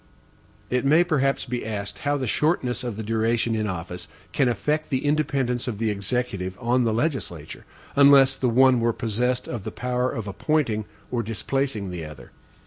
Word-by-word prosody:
It 125 0 +1
may 155 +5 +5
perhaps 140 -5 +1
be 125 -1 -3
asked, 100 -2 -5
how 145 0 0
the 135 - -2
shortness 130 -1 0
of 120 -4 -4
the 110 - -4
duration 115 +1 +1
in 110 -1 -1
office 90 -1 -5 0.2
can 135 -4 +2
affect 150 +6 -1
the 130 0 -1
independence 135 -5 0
of 115 -4 -3
the 110 0 0
Executive 100 -2 -2
on 120 +1 +2
the 115 - +2
legislature, 110 - -3 0.3
unless 140 -1 +7
the 130 -2 0
one 130 +1 +5
were 115 0 +1
possessed 125 +2 -1
of 120 -5 -5
the 110 - -4
power 125 +1 -1
of 110 -4 -5
appointing 110 -1 0 0.3
or 120 -1 0
displacing 115 -2 -2
the 85 -2 -5
other. 75 -1 -10
120 Hz, 175 wpm, -24 LUFS, 110-135 Hz, 0.3 s, unless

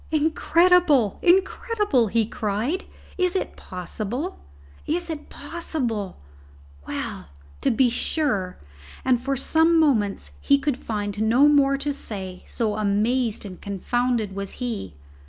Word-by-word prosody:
"Incredible! 320 - +3
incredible!" 380 - +2
he 225 +2 +2
cried. 225 - -2 0.3
"Is 365 0 +1
it 380 - -2
possible! 215 - -5 0.5
is 345 +2 -1
it 300 -2 -7
possible! 270 - -4 0.7
Well, - - -5 0.3
to - - +2
be 250 +3 +4
sure!" 220 - -1 0.5
And 250 -2 +3
for 275 +2 -1
some 320 +5 +3
moments 220 -11 +1
he 280 - +4
could 280 -2 -1
find 205 -3 -3
no 240 +6 +5
more 275 -2 +4
to 285 +1 -2
say, 190 -8 -5
so 215 -3 -2
amazed 215 +3 0
and 185 -3 -9
confounded 220 +1 -1
was 200 -1 -4
he. 220 - -4
250 Hz, 120 wpm, -24 LUFS, 210-305 Hz, 0.7 s, no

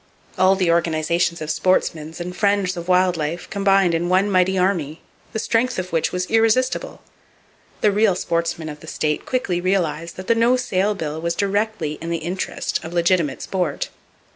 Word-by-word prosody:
All 185 +1 +4
the 185 -3 +2
organizations 170 +1 +1
of 155 - -2
sportsmen 160 -3 0
and 180 +1 -6
friends 200 -2 +1
of 170 0 -6
wild 180 -1 +3
life 160 +3 -3
combined 195 -3 +3
in 170 +1 0
one 190 +3 +3
mighty 185 0 +3
army, 175 -5 0 0.3
the 225 - -3
strength 235 +3 0
of 185 -1 -4
which 165 - +1
was 180 0 -1
irresistible. 225 +4 +1 0.8
The 210 - +4
real 205 -1 +3
sportsmen 170 -2 -2
of 150 -1 -7
the 160 - -13
state 150 -1 -2
quickly 220 -9 -1
realized 170 -3 -1
that 185 - -7
the 230 - +3
no 235 +2 +3
sale 205 -4 0
bill 160 -3 -4
was 170 0 -1
directly 200 -6 -1
in 165 - -5
the 170 - 0
interest 175 +4 -3
of 165 - -7
legitimate 170 -4 +1
sport. 180 -7 -2
180 Hz, 175 wpm, -21 LUFS, 165-195 Hz, 0.8 s, All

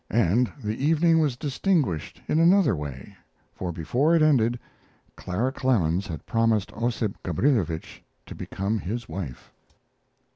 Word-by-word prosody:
And 115 +3 +2
the 110 +5 -3
evening 165 +2 +4
was 145 -6 +1
distinguished 140 - -1
in 155 - +2
another 175 - +5
way, 70 -4 -7 0.4
for 90 -2 -4
before 125 - +1
it 160 - +4
ended 120 -6 +3 0.6
Clara 110 +9 -2
Clemens 100 -10 +1
had 80 -4 -7
promised 115 -3 +1
Ossip 115 -2 -2
Gabrilowitsch 90 - 0 0.3
to - - -9
become 100 +3 -3
his 110 +5 -4
wife. 75 -11 -7
115 Hz, 125 wpm, -25 LUFS, 90-140 Hz, 0.6 s, another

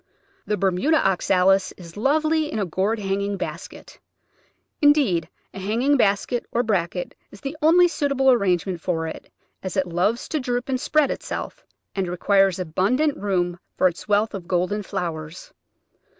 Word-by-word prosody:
The 210 - 0
Bermuda 195 - +2
Oxalis 190 0 +2
is 170 -2 -13
lovely 310 +6 +1
in - - -3
a 205 - 0
gourd 190 +6 0
hanging 200 0 -2
basket; - - -8 0.8
indeed, 260 - +3 0.2
a - - -7
hanging 230 +9 +1
basket, 230 +1 +1
or 240 - +1
bracket, 180 -5 -1 0.2
is 200 - -14
the 275 +3 -5
only 345 +3 +6
suitable 280 -4 +2
arrangement 185 -6 +1
for 165 -2 -1
it, 160 - -8 0.3
as 190 +1 -5
it 190 - +2
loves 180 +7 0
to 310 - -1
droop 250 0 -2
and 255 -1 -1
spread 305 -3 +2
itself, - - -5 0.3
and 190 -2 -2
re 175 +1 -4
quires 195 -1 +3
abundant 195 - +1
room 180 -3 -1 0.2
for 185 - +5
its 175 - -5
wealth 210 +1 +2
of 185 -4 -7
golden 185 +4 0
flowers. 170 -4 -5
200 Hz, 155 wpm, -23 LUFS, 180-255 Hz, 0.8 s, only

